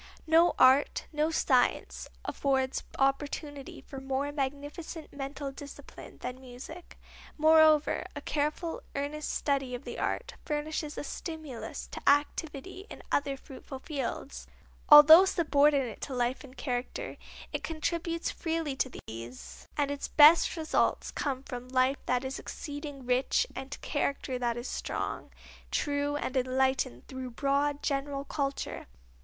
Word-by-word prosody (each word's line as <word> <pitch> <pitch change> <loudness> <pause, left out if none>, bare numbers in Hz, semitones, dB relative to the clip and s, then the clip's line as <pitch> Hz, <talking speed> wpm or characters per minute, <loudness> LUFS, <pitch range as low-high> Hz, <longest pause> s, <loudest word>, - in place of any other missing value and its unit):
No 325 +2 +5
art, 260 +2 +5
no 305 +1 +1
science, 260 -6 +1 0.2
affords 265 -2 0
opportunity 280 +1 -1
for 270 -1 -9
more 270 +2 -1
magnificent 290 +3 -5
mental 275 0 -5
discipline 280 +1 -11
than 250 +1 -5
music. 265 +7 -10 0.4
Moreover, 315 -1 +5
a - - -3
careful, 305 +3 -2
earnest 290 +2 -3
study 270 -3 0
of 245 - -8
the - - -6
art - - -2
furnishes 300 0 -3
a - - -3
stimulus 310 -6 -6
to - - -6
activity 300 +6 0
in - - -10
other 280 -1 +1
fruitful 265 0 -10
fields. 275 0 -5 0.4
Although 300 +4 +11
subordinate 290 - +2
to 270 - -4
life 245 +1 0
and 270 -1 -14
character 250 -2 -3 0.4
it - - -3
contributes 335 +1 -2
freely 325 -4 -2
to 260 - -2
these, 115 +3 -9
and 285 -1 +1
its 285 - -3
best 310 +4 +7
results 315 -1 +1
come 270 -2 -2
from 250 -2 -7
life 255 +2 +1
that 250 +1 +1
is 265 - -4
exceeding 290 -3 -7
rich, 250 - +2
and 275 +2 -6
character 280 -3 -2
that 240 -1 0
is 240 - -5
strong, - - -4 0.4
true 290 0 0
and 285 -3 -3
enlightened 260 - +1
through 260 -1 -6
broad, 280 +3 0
general 275 0 -1
culture. 280 -1 -3
280 Hz, 130 wpm, -30 LUFS, 260-300 Hz, 0.4 s, Although